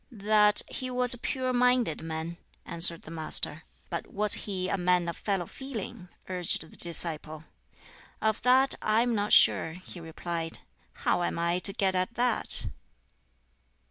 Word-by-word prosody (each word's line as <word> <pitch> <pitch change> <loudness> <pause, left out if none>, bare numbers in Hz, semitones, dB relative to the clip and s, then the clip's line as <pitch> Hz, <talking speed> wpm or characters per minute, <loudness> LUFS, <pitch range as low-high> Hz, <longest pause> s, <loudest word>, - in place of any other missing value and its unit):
"That 210 -1 +3
he 255 - -5
was 250 -1 +4
a - - -1
pure 255 +1 -2
minded 250 -7 +2
man," 160 +1 -5 0.3
answered 170 0 +1
the 160 - -11
Master. 155 -1 -2 0.3
"But 170 - -4
was 210 0 +3
he 185 -3 -1
a - - 0
man 180 -2 +1
of 170 - -4
fellow 195 -4 -2
feeling?" 230 -5 -8 0.2
urged 180 -2 -1
the - - -15
disciple. 160 -2 -2 0.8
"Of 220 0 0
that 260 +2 +5
I 215 +1 +2
am 240 -1 -1
not 205 -1 -1
sure," 160 - +6
he 180 0 -10
replied; 165 0 -3 0.5
"how - - +2
am 175 - -2
I 170 +1 0
to 195 - +2
get 195 -2 0
at 185 +5 -1
that?" 245 0 0
185 Hz, 155 wpm, -28 LUFS, 170-230 Hz, 0.8 s, sure